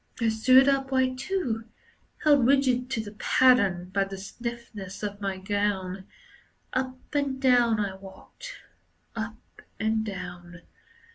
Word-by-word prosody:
I 230 -2 +2
stood 255 +5 +5
upright 265 -2 +1
too, 265 - -2 0.6
Held 285 -5 +5
rigid 260 -2 +2
to 250 -4 -1
the 210 -1 -8
pattern 195 -9 +3
By 195 - +2
the 195 0 -7
stiffness 215 -2 -7
of 205 0 -4
my 195 -1 -2
gown. 190 -1 -2 0.7
Up 255 0 -2 0.2
and 280 -2 0
down 245 -4 +4
I 200 -2 -1
walked, 195 - -12 0.5
Up 220 0 -7 0.2
and 220 0 +1
down. 180 -4 -8
225 Hz, 125 wpm, -27 LUFS, 195-260 Hz, 0.7 s, stood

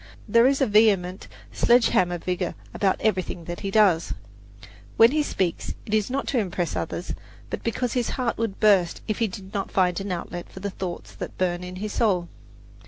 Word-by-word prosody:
There 235 +1 +5
is 275 +1 +2
a - - +5
vehement, 205 -4 +3 0.2
sledge 240 -1 +4
hammer 175 -1 +2
vigour 180 +1 -2 0.2
about 195 -2 +1
everything 185 -5 -1
that 175 +1 -6
he 195 - -3
does. 195 -5 +3 0.8
When 230 +2 +7
he 305 +1 +2
speaks, 185 - -2
it 210 - -5
is 215 0 +2
not 275 +2 -2
to 260 - +1
impress 180 -4 -2
others, 170 +2 -3 0.4
but - - -3
because 235 +1 -1
his 245 -3 0
heart 250 -3 0
would 225 -4 -2
burst 195 -5 +3
if 215 - -2
he 230 - +2
did 190 0 -9
not 200 -2 -2
find 185 -2 +2
an 195 0 -4
outlet 175 0 -5
for - - -9
the 200 +1 -4
thoughts 185 -2 -6
that - - -7
burn 180 -1 0
in 180 0 -7
his 205 +2 -4
soul. 185 -7 +1
195 Hz, 195 wpm, -25 LUFS, 180-225 Hz, 0.8 s, When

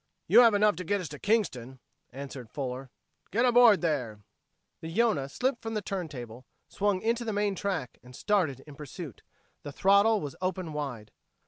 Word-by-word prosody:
"You - - +6
have 230 -3 +7
enough 210 -1 +4
to 180 - -4
get 200 +4 0
us 180 -5 -5
to 145 - -9
Kingston," 130 - -1 0.3
answered 135 -2 -8
Fuller. 130 0 -5 0.4
"Get 230 +5 +2
aboard 240 -4 +6
there!" 125 -11 -2 0.6
The 160 - -7
Yonah 165 -7 +1
slipped 250 - -1
from 225 0 -5
the 215 - -1
turn 185 -3 -3
table, 125 -3 -9 0.2
swung 200 -2 -1
into 230 +2 0
the 225 - -2
main 205 0 0
track 185 - -3
and 125 0 -14
started 170 - 0
in 150 - -13
pursuit. 150 - -9 0.4
The 145 - -7
throttle 200 +7 +4
was 145 -5 -6
open 185 -3 -3
wide. 130 -8 -5
175 Hz, 180 wpm, -29 LUFS, 135-205 Hz, 0.6 s, have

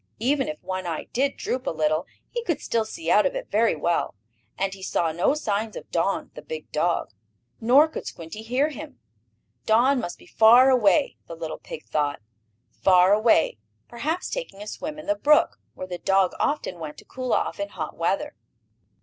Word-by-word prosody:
Even 270 +5 +1
if 305 0 -5
one 185 -1 -4
eye 165 -2 -3
did 275 +3 0
droop 255 0 -3
a - - +3
little, 155 0 0 0.2
he 475 -1 -3
could 340 -9 -1
still 225 -1 -1
see 325 +9 -4
out - - +5
of - - -5
it - - -6
very 225 -1 +3
well, 170 -4 -1 0.4
and 195 0 -1
he 195 - -11
saw 170 -3 0
no 175 - +1
signs 215 -6 -2
of - - -9
Don, - - 0
the - - -9
big 475 -1 -8
dog. - - 0 0.5
Nor 260 +7 +6
could 315 - -7
Squinty 165 +6 -8
hear 250 +7 +1
him. 255 - -9 0.7
Don 250 +5 +4
must 175 - -5
be - - -18
far 240 +4 +6
away, 255 +4 +3
the 165 - -7
little 160 -1 -6
pig 155 - -9
thought, 145 -2 -1 0.5
far 185 0 +4
away, 210 - +3 0.3
perhaps 310 +9 -3
taking - - -5
a 205 - -7
swim 300 +7 -6
in 305 - -9
the 305 - +2
brook, 300 0 +3 0.2
where - - -6
the 180 -1 -6
dog 195 0 +2
often 290 - -1
went 155 -2 -7
to - - -14
cool 255 -1 -5
off - - 0
in 200 0 -3
hot 160 -6 -6
weather. 195 - -1
220 Hz, 190 wpm, -25 LUFS, 180-285 Hz, 0.7 s, Nor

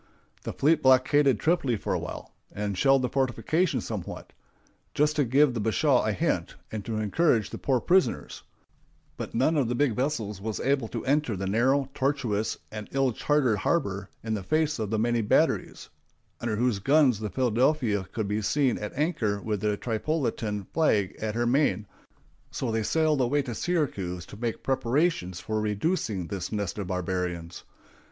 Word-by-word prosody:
The - - -4
fleet 155 +3 +2
blockaded 130 0 +4
Tripoli 155 -7 +1
for 100 - -3
a - - 0
while, - - -7 0.2
and 105 -1 -3
shelled 135 +5 +3
the - - +2
fortifications 135 +7 0
somewhat, 105 -6 -6 0.6
just 150 +1 +2
to 145 - +4
give 135 +2 +3
the 115 - -3
bashaw 105 -3 +2
a - - +1
hint, - - -1 0.2
and 110 -2 -4
to 110 -2 -3
encourage 110 - +1
the - - -6
poor 130 -2 +1
prisoners; 185 +8 +1 0.7
but - - -6
none 135 +7 +2
of 140 -5 +2
the 120 - -1
big 125 -3 +1
vessels 115 -7 -2
was 110 0 -3
able 135 -3 +1
to - - -5
enter 140 -6 +1
the 95 - -3
narrow, 130 +7 +2
tortuous, 130 -7 -1
and 105 -1 -7
ill 135 -1 +2
charted 130 -2 +1
harbor 100 - -1
in 110 -1 -2
the 105 - -2
face 155 - 0
of 110 -2 -2
the 110 - 0
many 120 +1 +1
batteries, 105 - +1 0.5
under 115 -2 -2
whose 120 -2 +1
guns 135 0 +4
the 105 -1 -3
Philadelphia 120 -3 +1
could 110 -3 -2
be 105 +2 -1
seen 135 +4 +1
at 105 - -5
anchor 130 - 0
with 105 -1 -3
the 105 -1 0
Tripolitan 115 - -2
flag 105 - +2
at 110 0 -2
her 120 +1 +1
main, 120 -6 +2 0.6
so 125 - -3
they 110 0 0
sailed 155 +4 +2
away 140 +4 +1
to 125 -3 -5
Syracuse 100 - -2
to - - -11
make 115 +1 -4
preparations 130 - 0
for 110 0 -2
reducing 105 - -1
this 95 +1 -5
nest 105 -2 -3
of 100 - -4
barbarians. 90 -2 -3
115 Hz, 175 wpm, -27 LUFS, 105-140 Hz, 0.7 s, blockaded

